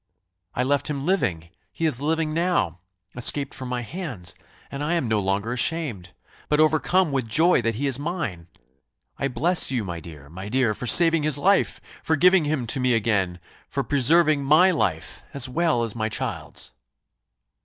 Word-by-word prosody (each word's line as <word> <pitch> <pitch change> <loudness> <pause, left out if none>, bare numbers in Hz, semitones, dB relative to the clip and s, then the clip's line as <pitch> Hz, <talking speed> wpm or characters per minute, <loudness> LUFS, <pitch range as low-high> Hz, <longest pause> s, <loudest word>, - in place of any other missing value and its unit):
I 125 - 0
left 140 +3 0
him 140 -2 -4
living 85 - -1 0.2
he 165 - -3
is 140 -5 -1
living 155 +1 -1
now 165 - 0 0.4
escaped 135 +3 0
from 130 -1 -6
my 125 -1 -2
hands 135 - -5 0.4
and 140 +1 -5
I 155 +3 -1
am 165 -8 0
no 110 -1 +1
longer 100 +4 -1
ashamed, 125 - -1 0.4
but 150 - +2
overcome 155 +2 +2
with 130 -4 -2
joy 160 +7 +3
that 115 -1 -1
he 140 +6 -3
is 135 -1 0
mine! 145 - -4 0.7
I 135 - 0
bless 170 +7 +2
you, 125 -6 -2
my 85 -2 -5
dear, 75 -4 -12
my 95 +6 -9
dear, 125 -2 +1
for 125 - -6
saving 165 +3 +6
his 150 -1 +2
life 195 +7 +2 0.2
for 160 - +1
giving 180 +1 +4
him 145 -4 -1
to 115 - 0
me 125 -1 +2
again 100 -5 0 0.3
for - - -2
preserving 150 +2 +3
my 155 +7 +5
life, 90 - -2
as 135 -2 +2
well 140 -3 0
as 115 -3 -4
my 110 -1 -2
child's." - - -4
135 Hz, 175 wpm, -23 LUFS, 110-160 Hz, 0.7 s, saving